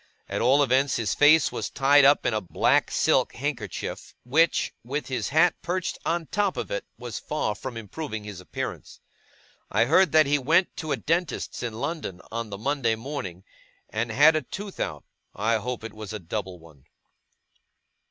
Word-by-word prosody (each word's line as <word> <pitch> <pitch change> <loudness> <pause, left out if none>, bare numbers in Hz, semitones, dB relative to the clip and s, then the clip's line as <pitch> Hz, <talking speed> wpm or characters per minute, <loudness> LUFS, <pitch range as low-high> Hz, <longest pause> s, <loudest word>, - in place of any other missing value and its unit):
At - - -3
all 135 +5 +5
events 135 +1 +2
his 110 -5 0
face 150 +1 +5
was - - -3
tied 145 +1 +5
up 140 +1 +5
in - - +2
a 110 - 0
black 90 - +2
silk - - +2
handkerchief, 120 -8 -5
which, 160 +7 +2
with 140 +5 -4
his 125 -5 -2
hat 160 +5 +4
perched 180 +1 -2
on 170 +1 0
the 160 - -16
top 205 -3 0
of - - -4
it, - - -3
was - - -6
far 150 -8 -2
from 120 +3 -7
improving 110 +1 -6
his 105 -3 -8
appearance. - - -6 0.7
I - - +3
heard 185 +8 +4
that 155 -1 +6
he 145 +1 +2
went 165 +7 +2
to 155 -3 -4
a - - +1
dentist's 165 +2 -2
in 120 -2 -3
London 140 - -4
on 115 -1 -4
the 100 - -6
Monday 115 +1 0
morning, 110 - -6 0.5
and 115 +2 -1
had 150 +7 +6
a 155 - +1
tooth 195 +8 -8
out. - - -3 0.3
I 110 +3 +1
hope 120 +2 -5
it 115 -2 -7
was 110 -1 -8
a 105 - -4
double 95 +1 -5
one. 80 -5 -18
130 Hz, 180 wpm, -26 LUFS, 110-155 Hz, 0.7 s, that